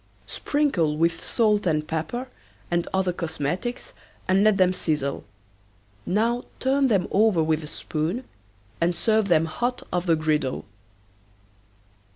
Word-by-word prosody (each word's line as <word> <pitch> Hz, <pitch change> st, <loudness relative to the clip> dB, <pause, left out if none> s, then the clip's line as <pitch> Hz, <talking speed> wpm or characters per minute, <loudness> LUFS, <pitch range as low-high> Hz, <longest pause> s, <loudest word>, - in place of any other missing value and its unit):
Sprinkle 200 Hz, -, 0 dB
with 165 Hz, +1 st, +1 dB
salt 210 Hz, -4 st, +2 dB
and 155 Hz, -2 st, 0 dB
pepper 165 Hz, +11 st, -3 dB, 0.4 s
and 175 Hz, 0 st, +1 dB
other 190 Hz, -1 st, +1 dB
cosmetics 170 Hz, -, -3 dB, 0.3 s
and 190 Hz, +2 st, +4 dB
let 215 Hz, -2 st, +4 dB
them 185 Hz, -1 st, +4 dB
sizzle. 150 Hz, -6 st, -2 dB, 0.8 s
Now 230 Hz, +6 st, +1 dB
turn 270 Hz, +1 st, +2 dB
them 195 Hz, -7 st, +2 dB
over 200 Hz, -5 st, +4 dB
with 155 Hz, 0 st, 0 dB
a -, -, -7 dB
spoon 160 Hz, -, -3 dB, 0.6 s
and 170 Hz, +1 st, +2 dB
serve 220 Hz, +3 st, +2 dB
them 165 Hz, -3 st, +4 dB
hot 245 Hz, +10 st, -2 dB
off 180 Hz, 0 st, -1 dB
the 165 Hz, -, +5 dB
griddle. 155 Hz, -4 st, -1 dB
180 Hz, 130 wpm, -25 LUFS, 160-220 Hz, 0.8 s, the